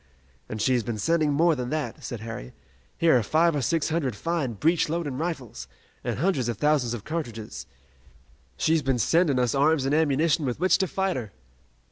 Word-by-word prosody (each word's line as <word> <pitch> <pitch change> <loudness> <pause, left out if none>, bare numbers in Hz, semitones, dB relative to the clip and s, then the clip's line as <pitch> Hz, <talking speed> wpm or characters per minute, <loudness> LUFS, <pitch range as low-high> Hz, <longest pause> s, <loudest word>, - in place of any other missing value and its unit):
"And 110 - -5
she 130 +5 +2
has 125 - +2
been 115 0 -4
sending 155 +7 +1
more 165 +4 +3
than 125 -2 -4
that," 150 -1 -3
said 115 -1 -6
Harry. 110 - -7 0.4
"Here 165 -4 +4
are - - 0
five 160 +8 +2
or 145 - 0
six 160 +4 0
hundred 150 -8 -1
fine 155 +1 -2
breech 155 - +1
loading 155 -5 -2
rifles, 155 -8 -4 0.4
and - - -2
hundreds 140 -6 0
of 115 - -3
thousands 140 -5 +1
of 105 - -8
cartridges. 120 -10 -5 0.9
She's 160 0 +2
been 135 -2 0
sending 150 - +2
us 125 -2 +1
arms 145 0 +2
and 135 - 0
ammunition 155 0 +2
with 125 -1 -2
which 185 0 +3
to 190 - +1
fight 190 -1 -1
her!" 110 -6 -6
145 Hz, 190 wpm, -26 LUFS, 120-165 Hz, 0.9 s, Here